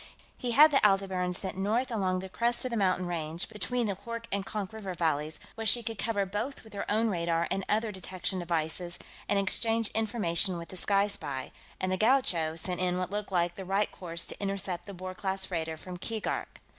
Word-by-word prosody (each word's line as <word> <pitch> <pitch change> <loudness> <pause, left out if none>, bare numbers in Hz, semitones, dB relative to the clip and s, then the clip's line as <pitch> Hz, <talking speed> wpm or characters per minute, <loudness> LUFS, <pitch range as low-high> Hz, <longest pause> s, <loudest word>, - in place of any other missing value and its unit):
He 245 -1 -1
had 305 +4 +8
the 275 - +4
Aldebaran 195 -3 +3
sent 185 +1 0
north 225 +7 +1
along 190 -5 +1
the 190 - -6
crest 235 +6 +1
of 255 - -2
the - - -1
mountain 185 -3 +2
range 165 -1 -2
between 235 +3 0
the 205 - 0
Hoork 230 +2 -6
and 200 0 +1
Konk 205 -1 -4
river 200 -4 -5
valleys, 155 -2 0
where 225 -1 -3
she 240 +2 +5
could 225 -2 -4
cover 205 -3 +1
both 210 +8 -4
with 220 - -15
her 200 - -4
own 220 +2 +3
radar 170 -2 0
and 195 - 0
other 220 +1 +1
detection 185 0 -2
devices 170 +1 +1 0.3
and 205 - +3
exchange 225 +3 +3
information 205 -5 +1
with 170 -1 -7
the - - -9
Sky 200 +2 +3
Spy, 140 -9 -4 0.3
and 185 - -1
the 185 - +1
Gaucho 190 -9 +3
sent 180 +2 -2
in 180 0 +1
what 185 0 -2
looked 205 -1 -3
like 175 -1 +2
the 190 - -7
right 195 +2 +1
course 170 -2 -5
to - - -7
intercept 195 -2 -2
the 200 - -7
Boer 185 +1 -6
class 190 0 -2
freighter 160 -3 -3
from 180 +3 -8
Keegark. 220 +3 -3
195 Hz, 210 wpm, -30 LUFS, 175-220 Hz, 0.3 s, had